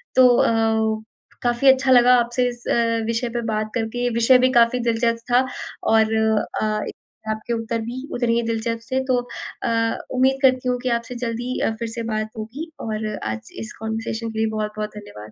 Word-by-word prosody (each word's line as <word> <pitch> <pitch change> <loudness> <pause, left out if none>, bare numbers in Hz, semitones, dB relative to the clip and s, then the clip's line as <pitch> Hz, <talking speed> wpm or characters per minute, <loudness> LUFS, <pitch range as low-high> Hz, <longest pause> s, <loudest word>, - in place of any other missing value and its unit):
तो 255 -1 +8
अ, 220 -1 +2 0.4
काफ़ी 240 +2 +1
अच्छा 265 0 +1
लगा 250 0 +7
आपसे 240 +1 +1
इस 240 0 -10
अ, 230 -1 +1
विषय 230 +2 -1
पे 240 +1 -3
बात 215 0 -2
करके। 245 +1 -1
विषय 235 +3 +5
भी 255 +1 +3
काफ़ी 235 0 +4
दिलचस्प 230 0 0
था 250 +2 +4 0.5
और 220 0 +4 0.5
अ, 215 0 0
एक - - -6 0.4
आपके 215 +2 -2
उत्तर 230 0 -2
भी 245 +4 -5
उतने 240 -1 +1
ही 235 - +2
दिलचस्प 230 0 -2
थे। 260 0 +1
तो 255 -1 +2 0.5
अ, 230 0 +1 0.2
उम्मीद 265 +1 +3
करती 255 -2 +3
हूँ 250 - +1
कि 255 - 0
आपसे 235 +2 -9
जल्द 230 0 -3
ही 250 +2 -3
अ, - - +1
फिर 230 - -2
से 230 +1 -5
बात 215 0 -2
होगी 260 +10 -6
और 215 -1 -3 0.2
आज 110 0 -5
इस 110 - -7
कॉन्वर्सेशन 225 +1 -3
के 220 - -5
लिए 220 - +2
बहुत-बहुत 210 0 -3
धन्यवाद। 110 - -10
230 Hz, 190 wpm, -22 LUFS, 220-245 Hz, 0.5 s, तो